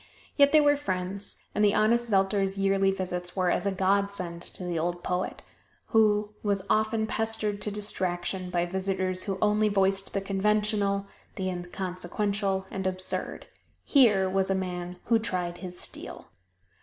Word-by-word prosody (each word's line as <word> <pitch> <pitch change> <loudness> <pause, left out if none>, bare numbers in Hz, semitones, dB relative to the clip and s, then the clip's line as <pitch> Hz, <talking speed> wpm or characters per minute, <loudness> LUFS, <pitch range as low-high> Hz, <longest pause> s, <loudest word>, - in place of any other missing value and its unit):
Yet 285 -1 +5
they 310 - +7
were 290 0 +4
friends, 190 -5 -3 0.2
and 210 - +1
the 205 -1 +4
honest 235 +2 +3
Zelter's 195 0 +2
yearly 195 0 +3
visits 180 -2 -3
were 185 -2 +2
as - - 0
a - - +2
godsend 190 -2 0
to 185 - -6
the 175 -2 -2
old 175 +2 -2
poet, 180 +1 -2 0.5
who 210 -1 +3
was 200 -2 0
often 220 0 +2
pestered 220 -2 -1
to - - -1
distraction 185 -3 -2
by 175 -1 0
visitors 185 0 -1
who 195 -2 -2
only 210 0 +3
voiced 195 -1 +1
the - - +2
conventional, 200 0 +1 0.3
the 185 -1 -2
inconsequential 190 +2 -2
and 190 -1 -2
absurd. 185 0 -3 0.4
Here 210 -9 +4
was 190 0 +1
a 195 - +2
man 180 -1 -4
who 230 -1 +3
tried 180 -5 -3
his 180 -2 -6
steel. - - -7
195 Hz, 155 wpm, -28 LUFS, 185-210 Hz, 0.5 s, they